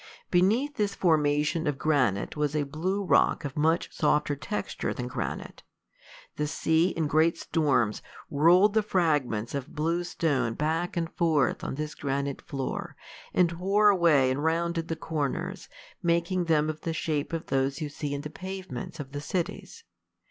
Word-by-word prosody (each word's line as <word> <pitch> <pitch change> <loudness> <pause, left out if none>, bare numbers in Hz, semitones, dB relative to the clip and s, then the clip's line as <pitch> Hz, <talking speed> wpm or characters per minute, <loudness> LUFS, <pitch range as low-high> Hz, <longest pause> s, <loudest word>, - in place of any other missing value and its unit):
Beneath 225 +11 +2
this 205 -1 0
formation 150 -1 +2
of 145 -2 0
granite 130 -11 +1
was 150 0 -1
a 150 - +2
blue 180 +8 -2
rock 170 - +3
of 140 - -5
much 160 +3 +1
softer 150 -1 +1
texture 115 -6 -3
than 125 - -4
granite. 125 - -5 0.8
The 150 - 0
sea, 160 +3 +2
in 165 -3 -1
great 160 +3 +3
storms, 135 -11 +1 0.3
rolled 175 +8 +5
the 220 - +4
fragments 145 - 0
of 140 -2 -5
blue 165 +3 0
stone 145 -9 0
back 165 +4 -1
and 165 -1 -2
forth 160 -5 +1
on - - -3
this 150 +1 -4
granite 140 0 -3
floor, 135 -2 -4 0.4
and 175 -2 +3
wore 195 +5 +3
away 165 -9 +4
and 140 +3 -2
rounded 165 +1 0
the 165 - -2
corners, 160 +5 -3 0.3
making 170 +1 +1
them 155 -2 +2
of 155 0 -4
the 165 - -2
shape 155 -3 -2
of 165 -1 -3
those 135 +2 0
you 155 - -2
see 145 0 -5
in 140 - -4
the 150 0 -7
pavements 185 -1 -7
of 135 -2 -7
the 145 0 -5
cities. 185 - -4
160 Hz, 165 wpm, -28 LUFS, 145-175 Hz, 0.8 s, rolled